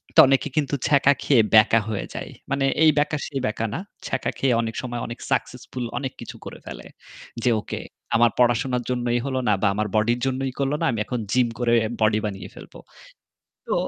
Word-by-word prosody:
তো - - +6
অনেকে 135 +1 +2
কিন্তু 145 -1 +1
ছ্যাঁকা 140 -1 +5
খেয়ে 130 -5 +5
বেঁকা 110 +1 +6
হয়ে 105 - -3
যায়। - - -6 0.2
মানে 140 0 +1 0.2
এই 155 - +8
ব্যাকা 150 +1 +1
সেই 140 -2 -3
ব্যাকা 110 +1 -1
না। - - -2 0.3
ছ্যাকা 130 - -1
খেয়ে 130 -3 +2
অনেক 115 -1 -4
সময় 120 -2 -4
অনেক 115 - -7
সাকসেসফুল 125 0 -2
অনেক 135 -2 -3
কিছু - - -8
করে - - -8
ফেলে। - - -8 0.6
যে - - +3
ওকে - - -5 0.4
আমার 120 0 +5
পড়াশোনার 125 +1 +2
জন্যই 120 -1 0
হলো 130 -1 -1
না 105 - +4
বা 105 - +3
আমার 105 +1 -1
বডির 115 +3 +2
জন্যই 135 0 -1
করল 140 +1 0
না। - - +2
আমি 115 - -3
এখন 125 - -3
জিম 125 0 +3
করে 120 -1 +2 0.3
বডি 110 0 +3
বানিয়ে 95 -3 -5
ফেলবো। - - -12 0.9
তো - - 0
125 Hz, 195 wpm, -23 LUFS, 115-135 Hz, 0.9 s, এই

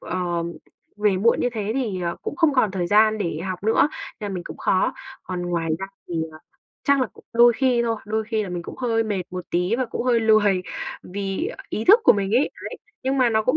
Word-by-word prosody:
ờ, 175 -2 -2 0.5
về 210 -2 +2
muộn 225 +5 +3
như 245 - +1
thế 215 -2 -2
thì, 220 -9 -1
ờ, 170 -1 -2
cũng - - -4
không 325 -5 +3
còn 240 -6 +3
thời 185 -2 -2
gian 215 +2 +4
để 170 -6 -2
học 185 -1 -4
nữa, 225 +6 +4 0.3
nên 205 -1 -4
là - - -4
mình 175 -1 -5
cũng - - -8
khó. 185 - +2 0.3
Còn 180 -1 -4
ngoài 170 -2 -1
ra 195 - -4 0.2
thì, 175 - -5 0.2
ờ, 155 - -12 0.5
chắc 280 -1 +4
là 255 - +2
cũng - - -19
đôi 240 +1 +6
khi 245 0 +2
thôi, 230 -1 0
đôi 220 +1 -1
khi 220 -1 -1
là 200 - -5
mình 175 -1 -4
cũng - - -9
hơi 230 -3 +1
mệt 205 -4 -2
một 180 -1 -5
tí 180 +6 +1
và 260 - 0
cũng 230 - -4
hơi 240 -2 +3
lười 210 -4 +4 0.4
vì 195 - -3 0.2
ý 220 - -3
thức 425 +6 +7
của - - +8
mình 200 -1 -1
ấy. 255 +5 +3 0.2
Đấy, - - -7 0.3
nhưng 265 +1 0
mà 245 -2 +4
nó 220 0 +2
cũng 255 +7 +2
215 Hz, 245 wpm, -23 LUFS, 185-235 Hz, 0.5 s, của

